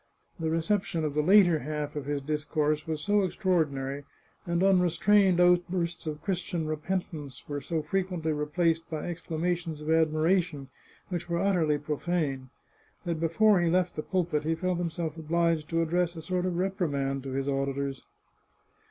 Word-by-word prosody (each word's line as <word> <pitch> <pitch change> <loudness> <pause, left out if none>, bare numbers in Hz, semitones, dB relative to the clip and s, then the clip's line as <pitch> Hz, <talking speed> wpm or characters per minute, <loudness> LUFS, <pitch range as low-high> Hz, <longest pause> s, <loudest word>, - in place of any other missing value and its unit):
The 160 -1 -1
reception 165 +1 0
of 150 - -2
the 150 - +2
later 175 -1 +6
half 150 +1 -4
of 145 -2 -4
his 145 -1 -1
dis 150 +1 -2
course 155 0 0
was 155 -2 -2
so 205 0 +3
extraordinary, 150 -8 0 0.4
and 170 +1 +1
unrestrained 190 +1 +4
outbursts 175 -1 +2
of 150 -1 -5
Christian 180 -4 -2
repentance 155 -3 -4
were 145 -1 -4
so 160 +2 -2
frequently 180 -5 -1
replaced 165 +2 0
by 155 -2 -4
ex 175 0 -5
clamations 165 -1 -2
of 155 +1 -3
admiration 160 -2 +2 0.4
which 175 -1 -4
were 170 - 0
utterly 170 -5 +2
profane, 150 -3 -2 0.6
that 170 -2 -2
before 180 +4 +4
he 170 - +2
left 180 +1 +1
the - - -2
pulpit 170 -4 -1
he 160 +1 0
felt 180 +1 -1
himself 165 -2 -3
obliged 165 0 0
to 165 0 +1
address 175 +1 0
a 160 - -7
sort 180 +2 -1
of 175 -2 -2
reprimand 145 -8 -1
to 135 0 -6
his 135 +1 -2
auditors. 135 -1 -2
165 Hz, 160 wpm, -28 LUFS, 150-180 Hz, 0.6 s, later